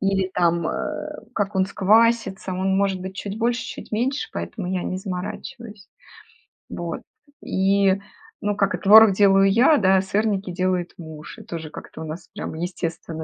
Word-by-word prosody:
или, 195 Hz, -1 st, 0 dB
там, 170 Hz, -1 st, +2 dB
э, -, -, -5 dB
как 205 Hz, -1 st, -1 dB
он 190 Hz, -, +3 dB
сквасится, 210 Hz, -1 st, +2 dB
он 190 Hz, +1 st, 0 dB
может 195 Hz, -2 st, +1 dB
быть 190 Hz, +1 st, -7 dB
чуть 205 Hz, +1 st, -5 dB
больше, 235 Hz, +1 st, 0 dB
чуть -, -, -8 dB
меньше, 265 Hz, -, -1 dB
поэтому 185 Hz, -5 st, -5 dB
я 185 Hz, -1 st, -1 dB
не 185 Hz, -, -3 dB
заморачиваюсь. 205 Hz, +3 st, -7 dB, 0.8 s
Вот. 170 Hz, -1 st, -5 dB, 0.4 s
И, 195 Hz, 0 st, +2 dB, 0.5 s
ну, 205 Hz, 0 st, -1 dB
как 200 Hz, -1 st, +1 dB
и -, -, -5 dB
творог 215 Hz, 0 st, +8 dB
делаю 195 Hz, 0 st, +5 dB
я, 255 Hz, +8 st, +5 dB
да, 190 Hz, -2 st, +4 dB
сырники 200 Hz, -1 st, -1 dB
делает 180 Hz, -1 st, -1 dB
муж. 160 Hz, -3 st, -10 dB
И -, -, -11 dB
тоже 160 Hz, -2 st, -7 dB
как-то 155 Hz, -, -10 dB
у -, -, -5 dB
нас, 155 Hz, +3 st, -7 dB
прям, 205 Hz, -, -5 dB
естественно 165 Hz, -2 st, -4 dB
195 Hz, 165 wpm, -23 LUFS, 180-210 Hz, 0.8 s, творог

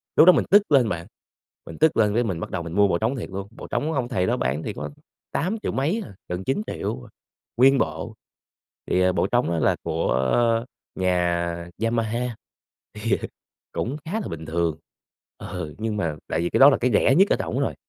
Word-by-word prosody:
Lúc -, -, +8 dB
đó 180 Hz, -, +10 dB
mình -, -, +1 dB
tức 205 Hz, -3 st, +5 dB
lên 130 Hz, -6 st, +5 dB
bạn, 85 Hz, -3 st, -4 dB, 0.6 s
mình 80 Hz, -, -9 dB
tức 160 Hz, -, +3 dB
lên 105 Hz, -2 st, +3 dB
cái 120 Hz, +3 st, +2 dB
mình 95 Hz, -8 st, -2 dB
bắt -, -, -5 dB
đầu 85 Hz, -2 st, -3 dB
mình 85 Hz, 0 st, -7 dB
mua 100 Hz, +2 st, +4 dB
bộ 90 Hz, -, +1 dB
trống 115 Hz, +8 st, 0 dB
thiệt 120 Hz, -, -5 dB
luôn, 100 Hz, +1 st, -5 dB
bộ -, -, -10 dB
trống 155 Hz, +2 st, -1 dB
ông 130 Hz, -5 st, -1 dB
thầy 95 Hz, -8 st, 0 dB
đó -, -, +1 dB
bán 65 Hz, +5 st, -1 dB
thì 105 Hz, -, -4 dB
có -, -, -5 dB, 0.4 s
tám 185 Hz, +8 st, -1 dB
triệu -, -, -1 dB
mấy 160 Hz, -, 0 dB
à, 100 Hz, -, -13 dB
gần 90 Hz, +1 st, -3 dB
9.000.000 135 Hz, -, -3 dB, 0.5 s
nguyên 135 Hz, +3 st, +6 dB
bộ, -, -, -2 dB, 0.7 s
thì, 90 Hz, -, +2 dB
ờ, 90 Hz, 0 st, +4 dB
bộ -, -, +1 dB
trống 120 Hz, +4 st, +1 dB
đó 85 Hz, -, 0 dB
là -, -, +3 dB
của 80 Hz, -4 st, 0 dB, 0.8 s
nhà 90 Hz, -2 st, +1 dB, 0.4 s
Yamaha 115 Hz, 0 st, 0 dB
thì 120 Hz, -, -8 dB, 1.4 s
cũng 130 Hz, +5 st, -2 dB
khá 160 Hz, -, -6 dB
là -, -, -5 dB
bình 80 Hz, -1 st, -7 dB
thường 80 Hz, -1 st, -1 dB, 0.6 s
ừ, 85 Hz, -4 st, -6 dB
nhưng 110 Hz, -1 st, -2 dB
mà 85 Hz, -7 st, -1 dB
tại 80 Hz, -, 0 dB
vì 85 Hz, -, -1 dB
cái -, -, +1 dB
đó 140 Hz, +2 st, +10 dB
là -, -, +3 dB
cái 125 Hz, -, +2 dB
rẻ 135 Hz, -, +4 dB
nhất 195 Hz, +6 st, +5 dB
ở -, -, +4 dB
trỏng -, -, -2 dB
rồi. -, -, 0 dB
105 Hz, 215 wpm, -24 LUFS, 85-130 Hz, 1.4 s, đó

